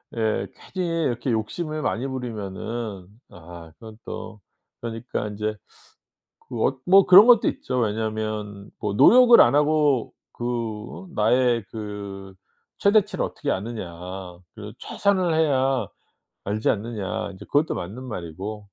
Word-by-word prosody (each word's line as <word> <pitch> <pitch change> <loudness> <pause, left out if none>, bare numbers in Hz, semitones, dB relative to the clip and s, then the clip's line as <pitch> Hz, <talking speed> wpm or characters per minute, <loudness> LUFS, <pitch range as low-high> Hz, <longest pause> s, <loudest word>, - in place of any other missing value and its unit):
예. 110 -1 0 0.3
괜히 170 -3 -1
이렇게 120 0 -1
욕심을 155 +8 -3
많이 130 0 -1
부리면은 110 -4 -5 0.2
아 85 -1 -12
그건 110 -2 -11
또 110 -1 -7 0.4
그러니까 115 -2 -4
인제 105 +1 -3 0.9
그 115 -3 -2
어 135 - -1
뭐 195 +1 +6
그런 195 +5 +9
것도 235 -3 +6
있죠. 125 -1 -3
왜냐하면 110 -2 -3
뭐 105 -1 -2
"노력을 245 - +7
안 - - +6
하고 150 -4 +2 0.2
그 120 - -5
나의 120 0 +2
그 100 -3 -7 0.4
최대치를 205 0 +2
어떻게 145 - -4
아느냐. 100 -3 -4 0.6
그리고 105 -1 -9
최선을 185 -5 0
해야 135 -4 +2 0.6
알지 105 +2 0
않느냐." 110 -1 -3
인제 100 +2 -12
그것도 145 +2 +1
맞는 105 +9 -6
말이고 100 -1 -6
115 Hz, 265 characters per minute, -24 LUFS, 105-140 Hz, 0.9 s, 그런